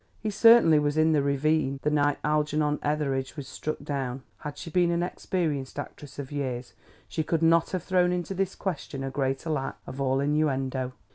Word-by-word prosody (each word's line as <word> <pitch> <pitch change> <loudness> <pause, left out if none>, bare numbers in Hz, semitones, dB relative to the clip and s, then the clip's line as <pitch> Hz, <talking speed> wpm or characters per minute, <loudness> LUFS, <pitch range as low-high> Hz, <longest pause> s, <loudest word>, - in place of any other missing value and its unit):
He 215 - -2
certainly 215 -7 +7
was 145 +1 0
in 160 +1 +4
the 150 -2 +3
ravine 140 0 +1
the 150 - +1
night 145 -1 +2
Algernon 150 0 +1
Etheridge 145 -2 -1
was 140 -3 -6
struck 155 - -4
down." 135 -3 -3 0.2
Had 150 -1 -7
she 165 - -7
been 175 +1 +3
an 170 0 +1
experienced 155 -7 -2
actress 145 -1 -8
of 140 -1 -6
years 130 -4 -3 0.3
she 160 - -2
could 165 +1 0
not 165 0 +4
have 185 -3 -3
thrown 180 -1 +2
into 180 +1 -2
this 190 0 -1
question 150 -7 -4
a 135 - -3
greater 135 +3 -1
lack 135 -3 -2
of 135 - -6
all 135 0 +1
innuendo. 135 -3 0
150 Hz, 190 wpm, -27 LUFS, 135-165 Hz, 0.3 s, certainly